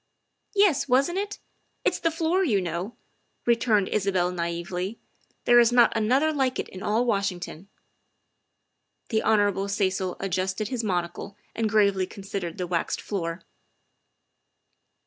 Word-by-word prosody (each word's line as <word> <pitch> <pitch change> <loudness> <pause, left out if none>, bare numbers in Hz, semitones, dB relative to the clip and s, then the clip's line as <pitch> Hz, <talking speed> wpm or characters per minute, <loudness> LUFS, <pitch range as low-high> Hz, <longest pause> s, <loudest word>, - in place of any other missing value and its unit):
" - - -52
Yes, 395 -10 +4
wasn't 275 +8 +2
it? 410 +1 -4 0.5
It's - - +1
the 330 - +2
floor, 330 +3 +1
you 225 - +2
know," 180 +4 -4 0.5
returned 230 -4 +3
Isabel 190 -3 +1
naively; 175 +4 -3
' - - -39
' - - -42
there 240 0 +7
is 235 0 +5
not 240 -2 +5
another 260 +8 +2
like 265 -3 0
it - - -3
in 185 - -9
all 225 +4 +1
Wash 200 -4 +1
ington. 175 0 -8 0.5
' - - -50
' - - -48
The 220 -2 +1
Hon. 205 -2 +2
Cecil 190 -2 -1
adjusted 190 +2 -2
his 245 -3 -2
monocle 180 0 -3 0.2
and 225 -1 -1
gravely 200 -3 +3
con 200 - -11
sidered 195 -4 -4
the 180 - -2
waxed 175 -1 -1
floor. 170 -3 -4
205 Hz, 155 wpm, -26 LUFS, 185-240 Hz, 0.5 s, there